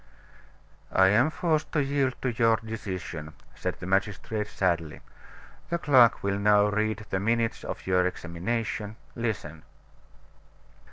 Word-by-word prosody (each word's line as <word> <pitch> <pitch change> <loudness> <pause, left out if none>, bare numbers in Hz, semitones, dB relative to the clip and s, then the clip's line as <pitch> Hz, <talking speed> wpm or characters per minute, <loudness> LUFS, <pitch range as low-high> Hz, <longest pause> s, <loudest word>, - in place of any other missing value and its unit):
"I 95 0 +6
am 120 +9 +4
forced 155 -1 -1
to 150 - +2
yield 135 -2 0
to 130 - +1
your 115 0 +3
decision," 95 -8 -6 0.2
said - - -3
the - - -7
magistrate 100 +2 -1
sadly. 85 -6 -1 0.7
"The 170 - 0
clerk 130 -8 +5
will 100 0 0
now 105 0 +4
read 110 0 -1
the 95 - +1
minutes 115 +3 0
of - - -6
your 90 -1 +3
examination 105 +5 -3 0.2
listen." 100 -10 -3
105 Hz, 125 wpm, -27 LUFS, 95-115 Hz, 0.7 s, I